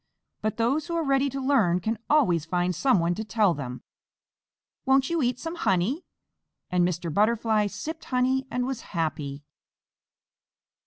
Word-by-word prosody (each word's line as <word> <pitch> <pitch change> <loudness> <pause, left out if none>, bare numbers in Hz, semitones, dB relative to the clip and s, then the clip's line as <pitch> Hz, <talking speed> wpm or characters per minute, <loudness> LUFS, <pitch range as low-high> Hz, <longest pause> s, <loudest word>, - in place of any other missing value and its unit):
But 215 -1 -2
those 270 +8 +1
who 340 - -3
are 335 - +1
ready 275 -1 +2
to 275 +1 -4
learn 245 -11 +3
can 220 +4 -2
always 180 - +3
find 180 +2 0
someone 175 -4 +2
to 220 - -4
tell 215 -4 +2
them. 125 -4 -6 1.0
Won't 265 +2 +3
you 335 -2 +1
eat 250 -1 +1
some 325 0 -5
honey?" 250 - 0 0.7
And 180 -1 +3
Mr. 170 -2 -3
Butterfly 215 +1 +2
sipped 315 - -6
honey 260 +1 +1
and 250 0 -1
was 260 -3 -3
happy. 150 -4 -3
225 Hz, 150 wpm, -26 LUFS, 175-270 Hz, 1.0 s, learn